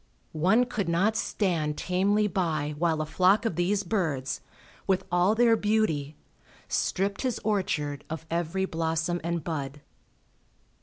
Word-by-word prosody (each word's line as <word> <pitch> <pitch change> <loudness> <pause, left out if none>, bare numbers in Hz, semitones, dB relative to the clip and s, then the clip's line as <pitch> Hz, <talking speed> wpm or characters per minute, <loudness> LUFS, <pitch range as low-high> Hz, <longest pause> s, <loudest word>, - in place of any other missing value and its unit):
One 190 +10 +3
could 205 -7 -2
not 195 +6 +2
stand 165 -9 -1
tamely 200 +4 +1
by 155 -6 -1
while 160 -2 +1
a - - -5
flock 190 +7 +3
of 225 - 0
these 190 +4 +1
birds, 160 -9 -1 0.5
with 190 -2 +1
all 180 +4 +3
their 230 0 +5
beauty, 205 -10 0 0.5
stripped 200 +2 -1
his 255 -3 -1
orchard 150 -9 -1
of 160 0 -5
every 170 +3 0
blossom 165 0 -1
and 170 -1 -2
bud. 145 -3 -4
175 Hz, 135 wpm, -27 LUFS, 160-200 Hz, 0.5 s, their